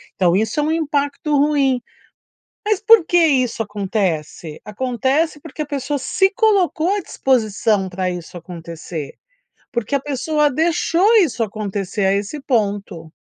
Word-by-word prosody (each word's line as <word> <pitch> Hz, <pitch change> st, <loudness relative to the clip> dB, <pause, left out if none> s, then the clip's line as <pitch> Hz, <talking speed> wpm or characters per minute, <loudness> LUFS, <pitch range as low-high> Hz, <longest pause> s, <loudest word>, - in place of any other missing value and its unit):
Então 180 Hz, -2 st, +3 dB
isso 220 Hz, +9 st, 0 dB
é -, -, +2 dB
um 305 Hz, -, 0 dB
impacto 295 Hz, -2 st, -1 dB
ruim. 275 Hz, -3 st, +2 dB, 0.9 s
Mas 425 Hz, -2 st, +1 dB
por 445 Hz, -4 st, +6 dB
que 350 Hz, -, +3 dB
isso 255 Hz, -8 st, +2 dB
acontece? 190 Hz, -7 st, -3 dB
Acontece 260 Hz, +8 st, -1 dB
porque 315 Hz, 0 st, -10 dB
a -, -, -6 dB
pessoa 285 Hz, 0 st, -2 dB
se 385 Hz, +8 st, +1 dB
colocou 380 Hz, -6 st, +2 dB
à -, -, -1 dB
disposição 215 Hz, -, 0 dB
pra 185 Hz, 0 st, -2 dB
isso 175 Hz, 0 st, -7 dB
acontecer. 165 Hz, -3 st, -8 dB, 0.6 s
Porque 235 Hz, +1 st, -2 dB
a 280 Hz, -, +2 dB
pessoa 295 Hz, +2 st, 0 dB
deixou 340 Hz, -, +2 dB
isso 250 Hz, -, +1 dB
acontecer 200 Hz, -1 st, -2 dB
a 195 Hz, -, +3 dB
esse 205 Hz, +9 st, -3 dB
ponto. 200 Hz, -, -2 dB
255 Hz, 140 wpm, -19 LUFS, 200-305 Hz, 0.9 s, por